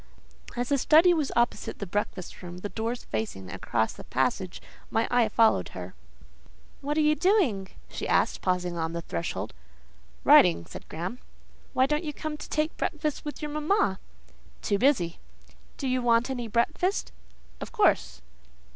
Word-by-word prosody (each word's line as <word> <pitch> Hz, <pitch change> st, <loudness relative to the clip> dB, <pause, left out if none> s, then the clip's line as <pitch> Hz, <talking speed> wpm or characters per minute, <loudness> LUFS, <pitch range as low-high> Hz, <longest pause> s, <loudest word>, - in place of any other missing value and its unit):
As 245 Hz, 0 st, -2 dB
the 280 Hz, -1 st, +2 dB
study 325 Hz, +6 st, +6 dB
was 305 Hz, -5 st, 0 dB
opposite 240 Hz, 0 st, 0 dB
the 200 Hz, -, -4 dB
breakfast 195 Hz, -1 st, -4 dB
room, 175 Hz, -1 st, -8 dB
the 205 Hz, +3 st, -5 dB
doors 230 Hz, +4 st, -3 dB
facing 105 Hz, -4 st, -4 dB
across 110 Hz, +3 st, -1 dB
the -, -, -10 dB
passage, 155 Hz, +8 st, -1 dB, 0.3 s
my 225 Hz, 0 st, +1 dB
eye 240 Hz, -3 st, +4 dB
followed 210 Hz, -, +3 dB
her. 90 Hz, 0 st, -7 dB, 0.9 s
"What 295 Hz, +2 st, -2 dB
are -, -, +4 dB
you 305 Hz, 0 st, +4 dB
doing?" 305 Hz, -, +2 dB, 0.2 s
she -, -, -5 dB
asked, -, -, +2 dB
pausing 180 Hz, -1 st, 0 dB
on 160 Hz, 0 st, -2 dB
the 170 Hz, 0 st, -4 dB
threshold. 85 Hz, -, -4 dB, 0.7 s
"Writing," 85 Hz, 0 st, +6 dB
said -, -, -11 dB
Graham. 180 Hz, +10 st, -5 dB, 0.5 s
"Why 260 Hz, -, +4 dB
don't 300 Hz, +4 st, 0 dB
you 300 Hz, -2 st, -3 dB
come 310 Hz, +1 st, -4 dB
to -, -, -9 dB
take 310 Hz, +1 st, 0 dB
breakfast 305 Hz, -1 st, -2 dB
with 295 Hz, +1 st, -6 dB
your 300 Hz, -, -3 dB
mamma?" 305 Hz, -, +1 dB, 0.6 s
"Too 200 Hz, -, +1 dB
busy." 220 Hz, -, +2 dB, 0.6 s
"Do 275 Hz, -, -3 dB
you 255 Hz, 0 st, +1 dB
want 240 Hz, +1 st, +3 dB
any 245 Hz, -3 st, -3 dB
breakfast?" 235 Hz, -, 0 dB, 0.5 s
"Of -, -, -7 dB
course." 425 Hz, -4 st, +2 dB
235 Hz, 160 wpm, -27 LUFS, 180-300 Hz, 0.9 s, study